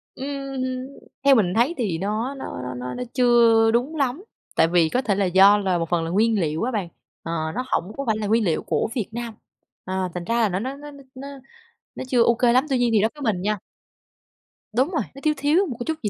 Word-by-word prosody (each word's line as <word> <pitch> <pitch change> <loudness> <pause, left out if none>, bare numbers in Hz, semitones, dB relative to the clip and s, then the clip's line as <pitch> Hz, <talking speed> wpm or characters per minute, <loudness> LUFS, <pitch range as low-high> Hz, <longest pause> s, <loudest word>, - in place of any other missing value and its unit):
Ừm 275 -1 -5
hưm, 255 0 -3 0.4
theo 280 -1 +7
mình 190 -7 +2
thấy 240 +8 +2
thì 205 -10 -1
nó 215 +8 -2
nó 265 - -7 0.2
nó 125 0 -5
nó 250 - -4
chưa 235 -3 +4
đúng 250 +7 0
lắm, 280 +3 -1 0.3
tại 160 - +4
vì 170 -1 +3
có 250 - 0
thể 210 -6 0
là 200 0 +1
do 190 +3 +6
là 190 -3 0
một 165 -1 -3
phần 175 -2 +1
là 165 - -3
nguyên 215 +4 +2
liệu 155 +1 -1
á 250 - -1
bạn. 205 -7 -2 0.4
Ờ, 165 - -5 0.2
nó 250 - -1
hổng 185 +5 -1
có 275 - -2
phải 220 -1 +1
là 215 -1 -3
nguyên 225 +2 +2
liệu 170 -5 0
của - - -1
Việt 225 -6 -2
Nam. 235 0 -5 0.5
Ờ, 185 0 -2
thành 180 - -5
ra 230 +6 -1
là 220 - +3
nó 185 0 -2
nó 260 +6 -4
nó 295 +1 -10 0.2
nó 270 +2 -8 0.7
nó - - -5
chưa 250 -2 +2
ô 235 - +4
kê 235 0 +3
lắm. 255 +3 +3
Tuy 265 - +1
nhiên 245 -1 +2
thì 215 - +4
đối 220 - +2
với 295 - -12
mình 180 - -5
nha 210 +2 0 1.1
Đúng 255 +7 +1
rồi, 325 - 0
nó 275 - -11
thiếu 305 -1 +3
thiếu 300 +8 +2
một 250 -6 -6
cái 240 - -4
chút 320 -1 -3
gì 210 - 0
230 Hz, 250 wpm, -23 LUFS, 195-260 Hz, 1.1 s, theo